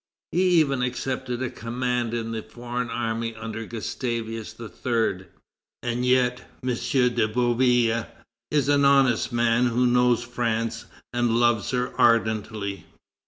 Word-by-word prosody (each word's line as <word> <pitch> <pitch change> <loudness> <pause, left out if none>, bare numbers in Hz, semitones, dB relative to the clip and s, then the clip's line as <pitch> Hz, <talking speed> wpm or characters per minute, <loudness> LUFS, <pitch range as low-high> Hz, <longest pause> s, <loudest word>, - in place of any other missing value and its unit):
He 175 - +1 0.2
even 140 -4 +1
accepted 125 0 -2
a 130 - -3
command 120 0 -2
in 115 -1 -3
the 110 -1 -3
foreign 120 +2 -5
army 115 0 -2
under 110 0 -6
Gustavus 115 -1 -4
III. 115 -4 -2 0.6
And 120 0 -1
yet 125 -1 +2 0.2
M. 130 - -1
de 125 -2 +1
Bouillé 120 0 +2 0.4
is 145 -3 +1
an 145 0 +3
honest 135 -4 +4
man 120 +1 +2
who 120 +1 +2
knows 125 -1 +3
France 115 -1 -2 0.3
and 120 -1 +1
loves 120 -3 +2
her 125 0 -1
ardently. 110 -3 +1
120 Hz, 125 wpm, -25 LUFS, 115-125 Hz, 0.6 s, honest